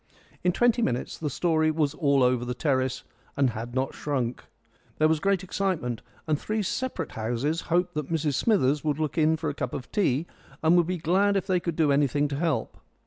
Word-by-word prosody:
In 180 Hz, -, +3 dB
twenty 240 Hz, +4 st, +2 dB
minutes 125 Hz, -, -2 dB
the 150 Hz, -, -2 dB
story 155 Hz, +2 st, +1 dB
was 155 Hz, -2 st, +1 dB
all 140 Hz, -4 st, +2 dB
over 125 Hz, -1 st, +2 dB
the 125 Hz, 0 st, -3 dB
terrace 130 Hz, -2 st, 0 dB, 0.3 s
and 135 Hz, -3 st, +3 dB
had 115 Hz, +2 st, -6 dB
not 130 Hz, +1 st, 0 dB
shrunk. 130 Hz, -5 st, -2 dB, 0.5 s
There 155 Hz, -, +4 dB
was 160 Hz, -1 st, +2 dB
great 195 Hz, +1 st, +1 dB
excitement, 180 Hz, -, -2 dB, 0.2 s
and 155 Hz, -2 st, 0 dB
three 215 Hz, 0 st, -2 dB
separate 200 Hz, -, -3 dB
houses 120 Hz, +9 st, -1 dB
hoped 175 Hz, +2 st, +1 dB
that 150 Hz, 0 st, -4 dB
Mrs 155 Hz, -3 st, 0 dB
Smithers 150 Hz, -, +2 dB
would 150 Hz, -2 st, 0 dB
look 155 Hz, -2 st, -2 dB
in 160 Hz, +1 st, +3 dB
for 155 Hz, -2 st, -2 dB
a -, -, -7 dB
cup 125 Hz, -3 st, -4 dB
of 130 Hz, -, -7 dB
tea, 165 Hz, -, +1 dB, 0.4 s
and 160 Hz, +2 st, +5 dB
would 175 Hz, -2 st, +4 dB
be 185 Hz, 0 st, -1 dB
glad 190 Hz, +5 st, +2 dB
if 190 Hz, -, -1 dB
they 185 Hz, -2 st, +2 dB
could 170 Hz, -2 st, -3 dB
do 155 Hz, -3 st, +3 dB
anything 145 Hz, +1 st, +2 dB
to 140 Hz, -, -3 dB
help. 155 Hz, -8 st, -1 dB
155 Hz, 205 wpm, -27 LUFS, 135-175 Hz, 0.5 s, and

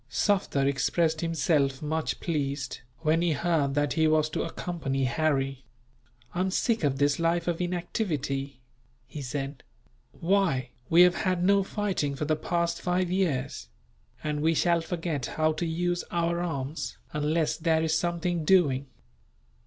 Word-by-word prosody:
Sufder 185 Hz, -9 st, +1 dB
expressed 155 Hz, +3 st, +1 dB
himself 150 Hz, -4 st, +1 dB
much 155 Hz, +1 st, -2 dB
pleased, 140 Hz, -5 st, -2 dB, 0.2 s
when 160 Hz, +1 st, +2 dB
he 170 Hz, -2 st, +2 dB
heard 150 Hz, -4 st, +1 dB
that 145 Hz, -1 st, +1 dB
he 160 Hz, -1 st, +3 dB
was 155 Hz, 0 st, +2 dB
to -, -, -1 dB
accompany 135 Hz, -6 st, -3 dB
Harry. 135 Hz, 0 st, 0 dB, 0.7 s
"I 175 Hz, -, -3 dB
am 190 Hz, +1 st, +1 dB
sick 225 Hz, +2 st, 0 dB
of 140 Hz, -2 st, +1 dB
this 145 Hz, +2 st, +2 dB
life 170 Hz, +1 st, +1 dB
of 175 Hz, 0 st, 0 dB
inactivity," 155 Hz, -, -2 dB, 0.4 s
he 145 Hz, +3 st, -8 dB
said. 135 Hz, 0 st, -4 dB, 0.5 s
"Why, 165 Hz, -9 st, +1 dB, 0.2 s
we 170 Hz, +2 st, +8 dB
have 180 Hz, 0 st, +4 dB
had 185 Hz, -2 st, 0 dB
no 200 Hz, +1 st, +5 dB
fighting 190 Hz, -8 st, -1 dB
for 150 Hz, -, -3 dB
the 155 Hz, +1 st, +2 dB
past 170 Hz, +2 st, -1 dB
five 180 Hz, 0 st, 0 dB
years; 180 Hz, -9 st, -1 dB, 0.6 s
and 150 Hz, -1 st, -1 dB
we 160 Hz, +1 st, +2 dB
shall 170 Hz, +1 st, +3 dB
forget 165 Hz, -5 st, -3 dB
how 155 Hz, 0 st, +1 dB
to 165 Hz, +2 st, -2 dB
use 175 Hz, +2 st, -1 dB
our 170 Hz, 0 st, 0 dB
arms, 145 Hz, -3 st, -4 dB, 0.2 s
unless 150 Hz, +1 st, +1 dB
there 160 Hz, -1 st, +2 dB
is 160 Hz, 0 st, +1 dB
something 170 Hz, 0 st, -1 dB
doing. 145 Hz, -6 st, +3 dB
160 Hz, 150 wpm, -28 LUFS, 140-175 Hz, 0.7 s, we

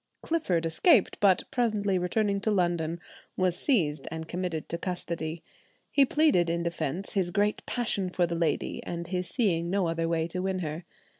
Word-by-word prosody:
Clifford 185 Hz, -, 0 dB
escaped, 195 Hz, -, +3 dB
but 190 Hz, -3 st, +4 dB
presently 210 Hz, -6 st, +1 dB
returning 200 Hz, +2 st, 0 dB
to 215 Hz, -, 0 dB
London, 175 Hz, -4 st, 0 dB, 0.4 s
was 185 Hz, -2 st, +2 dB
seized 155 Hz, -, +1 dB
and 160 Hz, 0 st, -6 dB
committed 175 Hz, -3 st, -3 dB
to 170 Hz, -, -4 dB
custody. 170 Hz, -3 st, -4 dB, 0.5 s
He 280 Hz, -, +5 dB
pleaded 275 Hz, -, +3 dB
in 170 Hz, 0 st, -1 dB
defence 170 Hz, +2 st, -3 dB
his 190 Hz, -4 st, +1 dB
great 205 Hz, +4 st, 0 dB
passion 205 Hz, -6 st, -1 dB
for 180 Hz, -1 st, +1 dB
the 170 Hz, -, -3 dB
lady, 165 Hz, -3 st, -1 dB
and 170 Hz, 0 st, -5 dB
his 180 Hz, 0 st, -3 dB
seeing 175 Hz, -9 st, +1 dB
no 190 Hz, -1 st, +1 dB
other 165 Hz, 0 st, -1 dB
way 165 Hz, -1 st, +1 dB
to 180 Hz, +2 st, -3 dB
win 190 Hz, 0 st, -1 dB
her. 165 Hz, -1 st, -4 dB
180 Hz, 170 wpm, -28 LUFS, 165-200 Hz, 0.5 s, He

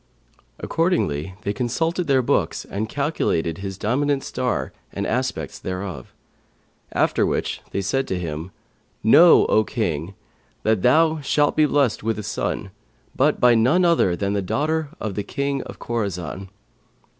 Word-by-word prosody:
Accordingly, 95 Hz, -, -1 dB
they 100 Hz, -, -1 dB
consulted 160 Hz, -, -1 dB
their 135 Hz, -2 st, +3 dB
books -, -, 0 dB
and 105 Hz, +2 st, -4 dB
calculated 110 Hz, -, -1 dB
his 95 Hz, -1 st, -5 dB
dominant 135 Hz, +6 st, 0 dB
star 125 Hz, -, -2 dB, 0.2 s
and -, -, -3 dB
the -, -, -2 dB
aspects -, -, -2 dB
thereof; 90 Hz, -7 st, -5 dB, 0.8 s
after -, -, +2 dB
which -, -, -1 dB
they 100 Hz, -, -2 dB
said 135 Hz, +8 st, -1 dB
to 95 Hz, -, -2 dB
him, 80 Hz, 0 st, -5 dB, 0.5 s
'Know, 165 Hz, +10 st, +7 dB
O 110 Hz, -, +3 dB
King, 90 Hz, -5 st, -3 dB, 0.5 s
that 110 Hz, -3 st, +2 dB
thou 160 Hz, -, +4 dB
shalt 145 Hz, +1 st, +2 dB
be 155 Hz, -1 st, +4 dB
blessed 140 Hz, -6 st, +1 dB
with 110 Hz, 0 st, -1 dB
a 105 Hz, -, -5 dB
son, 100 Hz, -1 st, -3 dB, 0.4 s
but 145 Hz, +3 st, +2 dB
by 125 Hz, -1 st, +6 dB
none 130 Hz, +11 st, +3 dB
other 165 Hz, -, +3 dB
than 100 Hz, +2 st, -1 dB
the 100 Hz, -, 0 dB
daughter 155 Hz, -, -1 dB
of 110 Hz, -2 st, -3 dB
the 105 Hz, -, -2 dB
King 140 Hz, +2 st, -2 dB
of -, -, -9 dB
Khorαsαn.' 95 Hz, -5 st, -4 dB
110 Hz, 150 wpm, -22 LUFS, 95-145 Hz, 0.8 s, Know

